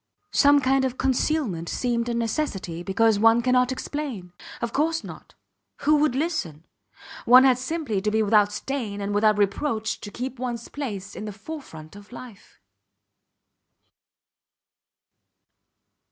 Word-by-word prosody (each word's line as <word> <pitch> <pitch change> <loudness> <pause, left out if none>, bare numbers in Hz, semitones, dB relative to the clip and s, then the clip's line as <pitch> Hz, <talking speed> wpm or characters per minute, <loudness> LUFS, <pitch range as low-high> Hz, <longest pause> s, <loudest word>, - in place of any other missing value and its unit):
Some 285 0 +5
kind 265 +1 +2
of 260 -1 -2
concealment 260 - 0
seemed 240 -1 -1
a 235 - -1
necessity 220 - -2
because 205 +3 +2
one 225 +2 +5
cannot 250 0 +3
explain. 255 -10 -5 0.3
Of 235 -1 -4
course 320 +3 0
not! - - -11 0.5
Who 300 +1 +4
would 295 -4 +2
listen? 220 - -3 0.6
One 250 +2 +8
had 255 -2 +4
simply 255 -7 -2
to 210 - 0
be 220 +1 +1
without 210 -1 +4
stain 220 -3 -4
and 200 0 -3
without 210 0 +3
reproach 215 +2 -1
to 205 - -7
keep 255 +3 -6
ones 240 -2 -4
place 205 -9 -6
in 215 - -6
the 210 - -5
forefront 200 - -10
of 205 +2 -14
life. 240 -4 -12
235 Hz, 135 wpm, -24 LUFS, 205-270 Hz, 0.6 s, One